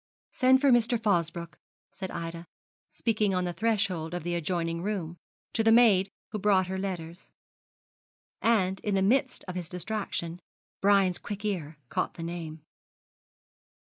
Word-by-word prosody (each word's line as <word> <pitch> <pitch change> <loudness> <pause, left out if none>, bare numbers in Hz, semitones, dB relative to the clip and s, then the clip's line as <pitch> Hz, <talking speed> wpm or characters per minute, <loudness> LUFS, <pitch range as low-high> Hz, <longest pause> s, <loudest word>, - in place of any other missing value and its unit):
'Send 260 0 +4
for 280 -1 +4
Mr. 240 -1 +4
Fosbroke,' 170 -6 -1 0.3
said 190 - -6
Ida, 170 0 -6 0.4
speaking 215 -4 +1
on 180 0 0
the 175 - -2
threshold 195 -7 0
of 175 - -4
the 175 +1 -2
adjoining 170 0 -1
room, 175 -4 -3 0.4
to 225 - +1
the 225 - +5
maid 215 -5 +6 0.2
who 215 - -3
brought 195 -2 +3
her 190 +1 -4
letters; 180 -3 -5 1.1
and, 195 -5 +2
in 205 -3 -1
the 190 - +2
midst 260 +5 +1
of 185 - -4
his 175 -3 -5
distraction, 180 -3 -3 0.4
Brian's 195 -2 +4
quick 205 0 -6
ear 165 -7 -3
caught - - -1
the 165 - -6
name. 165 -2 -6
185 Hz, 145 wpm, -28 LUFS, 170-215 Hz, 1.1 s, maid